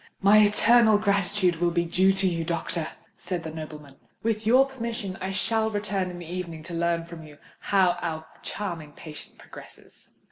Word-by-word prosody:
"My 200 +2 +6
eternal 220 +1 +5
gratitude 200 -3 +1
will 175 +1 +1
be 170 0 0
due 185 +3 +3
to 195 0 +1
you, 170 -2 -1
doctor," 170 0 -2 0.3
said 180 -3 -4
the 160 - -6
nobleman. 150 -3 -9 0.3
"With 220 -1 -1
your 255 +4 +6
permission 235 -7 -5
I 190 - -2
shall 220 +3 0
return 205 -3 -2
in 180 - -8
the 175 - -8
evening 170 -2 -6
to 170 - -7
learn 170 0 0
from 170 -1 -10
you 150 -2 -13 0.2
how 185 -3 +2
your 160 -1 -4 0.2
charming 170 -7 -5
patient 155 -1 -11
progresses." - - -15
180 Hz, 175 wpm, -26 LUFS, 165-205 Hz, 0.3 s, My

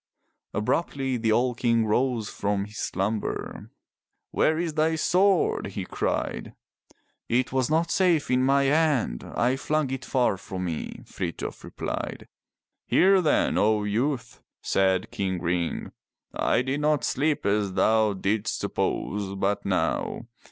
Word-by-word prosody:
Abruptly 135 +4 0
the 115 -1 +1
old 120 +1 +1
King 115 -2 +2
rose 115 0 +1
from 100 -1 -1
his 105 +1 -10
slumber. 100 +3 -3 0.6
Where 155 - +2
is 165 -1 -2
thy 160 +1 +2
sword?" 185 - +2
he 100 -1 -5
cried. - - -3 0.7
"It 125 +2 +1
was 130 0 +1
not 165 +2 +1
safe 175 -8 +2
in 125 0 +3
my 140 +1 +3
hand. 140 - +1
I 125 +2 0
flung 150 -1 0
it 135 -1 -4
far 125 -6 +1
from 95 0 -5
me," 80 -3 -5
Frith 85 -3 -5
jof - - -6
replied. - - -5 0.6
"Hear 190 0 +5
then, 155 - +2
O 105 0 +3
youth," 120 +3 -2 0.2
said 95 -1 +1
King 95 -2 -2
Ring. 85 -1 -2 0.4
"I 125 - +1
did 135 +3 -1
not 150 -1 +2
sleep 150 +2 0
as 100 -1 +1
thou 110 +1 +3
didst 100 +3 -1
suppose 100 -1 -2
but 100 +1 -1
now. - - -1
120 Hz, 135 wpm, -26 LUFS, 100-145 Hz, 0.7 s, Hear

